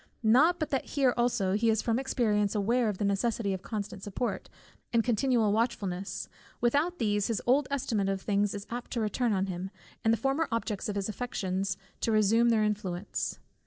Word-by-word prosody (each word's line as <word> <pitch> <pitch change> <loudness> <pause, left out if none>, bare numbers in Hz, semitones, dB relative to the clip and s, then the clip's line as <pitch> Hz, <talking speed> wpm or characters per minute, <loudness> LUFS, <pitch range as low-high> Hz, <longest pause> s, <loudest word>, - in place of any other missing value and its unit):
Not 280 +11 +5
but 310 - -3
that 270 - 0
here 265 -3 +4
also 240 -6 +1
he 225 +3 +2
is 220 -1 +2
from 230 +1 +1
experience 215 -6 +1
aware 225 +3 +2
of 205 - -3
the 205 - -1
necessity 200 +1 0
of 190 - -4
constant 205 -2 -5
support, 205 +5 -3 0.4
and 230 -2 +3
continual 240 -2 +2
watchfulness; 200 -5 -2 0.3
without 290 +9 +1
these, 205 -3 +1
his 225 -3 -1
old 265 +3 +3
estimate 225 -8 0
of 195 -1 -1
things 205 +1 0
is 200 0 -6
apt 240 +1 -5
to 235 - -1
return 225 +2 0
on 190 -1 +1
him, 185 0 -4 0.3
and 225 - +4
the 230 - +3
former 270 +8 0
objects 225 -3 -2
of 205 - -3
his 200 -1 -1
affections 195 -4 -2 0.2
to 230 - 0
resume 220 +2 +4
their 220 -2 +3
influence. 205 -3 -2
220 Hz, 190 wpm, -29 LUFS, 200-240 Hz, 0.4 s, Not